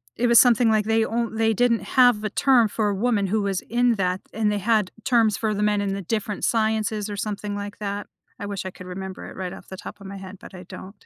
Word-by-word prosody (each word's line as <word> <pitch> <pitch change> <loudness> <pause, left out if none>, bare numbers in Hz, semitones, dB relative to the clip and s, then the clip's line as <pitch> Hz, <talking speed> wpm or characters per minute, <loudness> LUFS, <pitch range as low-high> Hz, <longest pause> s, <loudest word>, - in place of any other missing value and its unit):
it 245 - +1
was 235 -1 +7
something 240 -2 +5
like 215 -1 +2
they 225 0 +2
on 230 0 -2
they 225 0 +2
didn't 235 +1 +2
have 245 -5 +4
a 215 - -1
term 245 +1 +4
for 210 0 -1
a 200 - -1
woman 205 -1 +1
who 215 +3 0
was 195 -2 -1
in 240 0 +1
that, 185 -2 -1
and 215 -1 +1
they 205 - 0
had 210 -1 +1
terms 225 -4 +3
for 220 -1 -1
the 205 - -2
men 210 0 +2
in 200 -1 -1
the 200 - -4
different 210 +1 -3
sciences, 220 -2 0
or 205 - -5
something 205 0 -4
like 205 0 -6
that. 205 -1 -4 0.3
I 205 - -5
wish 200 -2 -5
I 185 - -4
could 180 0 -12
remember 190 +1 -7
it, - - -12
right 185 -1 -5
off - - -12
the 190 - -9
top 205 +1 -10
of 195 - -9
my 195 0 -7
head, 190 0 -10
but - - -13
I 180 - -9
don't. 190 +2 -12
210 Hz, 265 wpm, -24 LUFS, 195-225 Hz, 0.3 s, was